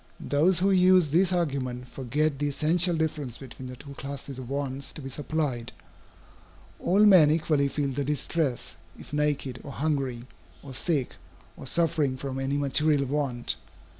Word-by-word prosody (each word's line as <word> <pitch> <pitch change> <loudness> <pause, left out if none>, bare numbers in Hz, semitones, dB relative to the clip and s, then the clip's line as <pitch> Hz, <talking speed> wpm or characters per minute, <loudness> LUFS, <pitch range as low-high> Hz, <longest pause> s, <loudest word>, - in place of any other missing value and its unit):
Those 165 +6 +2
who 195 +4 +2
use 185 -4 +5
this 180 +3 +3
argument 135 -8 -2
forget 140 +3 -1
the 145 - 0
essential 165 +5 +2
difference 150 -6 -2
between 130 -1 -9
the 125 - -7
two 140 +3 -11
classes 140 -1 -7
of 125 -2 -8
wants 140 -1 -3
to - - -8
be 135 - -5
supplied. 145 -5 -2 1.1
All 200 +4 +4
men 180 -7 +7
equally 155 -2 +2
feel 140 0 -1
the 140 +2 -2
distress, 140 - -1 0.2
if - - -13
naked, 145 -4 -1
or 140 - -8
hungry, 135 -6 -1 0.4
or 135 -2 -9
sick, 140 -1 -1 0.4
or - - -9
suffering 155 -4 +1
from 135 0 -4
any 135 +1 -1
material 145 0 +2
want. 130 - -1
145 Hz, 155 wpm, -27 LUFS, 135-155 Hz, 1.1 s, men